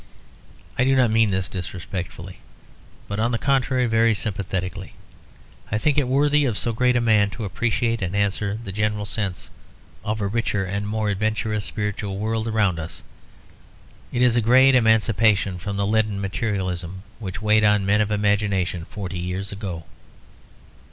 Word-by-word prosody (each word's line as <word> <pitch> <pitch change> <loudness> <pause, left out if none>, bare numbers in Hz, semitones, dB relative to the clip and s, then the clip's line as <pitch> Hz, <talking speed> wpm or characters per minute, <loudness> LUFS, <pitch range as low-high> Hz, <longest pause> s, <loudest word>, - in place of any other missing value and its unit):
I - - +5
do 135 +1 +3
not 125 -4 +4
mean 110 -1 +4
this 95 -1 0
disrespectfully, 90 0 -6 0.7
but 100 +1 -3
on 115 +2 +2
the 120 - 0
contrary 130 -1 +1
very 115 -1 +3
sympathetically; 95 -3 -3 0.8
I 105 - +1
think 145 +6 +1
it 135 - 0
worthy 145 +3 +3
of 115 -6 -1
so 120 - 0
great 125 +2 +2
a - - +4
man 110 -3 +3
to 100 +2 -6
appreciate 115 +2 -1
and 95 +1 -2
answer 100 +1 0
the 100 - -6
general 105 +1 -1
sense 100 -3 -3 0.5
of 110 +1 -2
a 100 - -1
richer 105 -1 -1
and 100 +2 -3
more 110 0 -1
adventurous 110 +1 -1
spiritual 105 -2 -3
world 110 +2 -1
around 105 -6 +1
us. 80 +3 -7 1.1
It 125 - +1
is 120 -2 +4
a 120 - +3
great 130 +4 +6
emancipation 110 -5 +3
from 100 +3 -4
the 100 - 0
leaden 110 -1 +1
materialism 95 -3 -3 0.2
which 105 0 -6
weighed 110 0 +4
on 105 -2 +3
men 105 +2 +3
of 105 - 0
imagination 100 -4 0
forty 95 -3 -6
years 90 +3 -3
ago. 95 -5 -5
105 Hz, 160 wpm, -23 LUFS, 95-115 Hz, 1.1 s, great